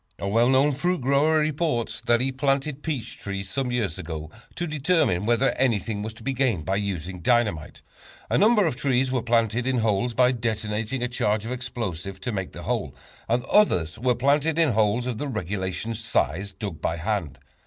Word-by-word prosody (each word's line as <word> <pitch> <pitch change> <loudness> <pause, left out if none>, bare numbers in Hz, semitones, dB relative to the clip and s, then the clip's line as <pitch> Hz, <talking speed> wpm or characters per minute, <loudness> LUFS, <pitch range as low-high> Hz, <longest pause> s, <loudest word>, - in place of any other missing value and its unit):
A 100 - -4
well 115 +5 +3
known 135 +3 +4
fruit 175 +6 0
grower 140 +5 +3
reports 150 -5 0
that 120 0 +4
he 135 +1 +1
planted 135 +1 0
peach 140 -8 -4
trees 100 -1 -4
some 135 0 -1
years 105 -8 -1
ago 80 -3 -6 0.2
to 175 - -2
determine 150 - +1
whether 120 +3 +3
anything 110 -4 0
was 110 +2 -4
to 115 - -12
be 135 - -1
gained 120 - 0
by 95 +1 0
using 95 -3 -3
dynamite. 105 -9 0 0.4
A - - 0
number 215 -1 +5
of 155 - 0
trees 130 -1 +1
were 130 -2 0
planted 115 +1 +1
in 130 -1 +1
holes 115 +1 0
by 125 0 +5
detonating 110 +1 -2
a - - +1
charge 110 -3 0
of 115 - -4
explosives 105 -7 -4
to 120 - -3
make 95 -4 -3
the - - -9
holes, - - -2 0.3
and 120 +2 +1
others 90 - +3
were 125 +1 +2
planted 145 +5 +2
in 160 -5 +4
holes 110 +2 +2
of 125 -3 -3
the 145 - -2
regulation 100 -1 -3
size, 100 - -1
dug 95 -5 -6
by 80 - 0
hand. 85 -6 -2
120 Hz, 190 wpm, -25 LUFS, 100-135 Hz, 0.4 s, number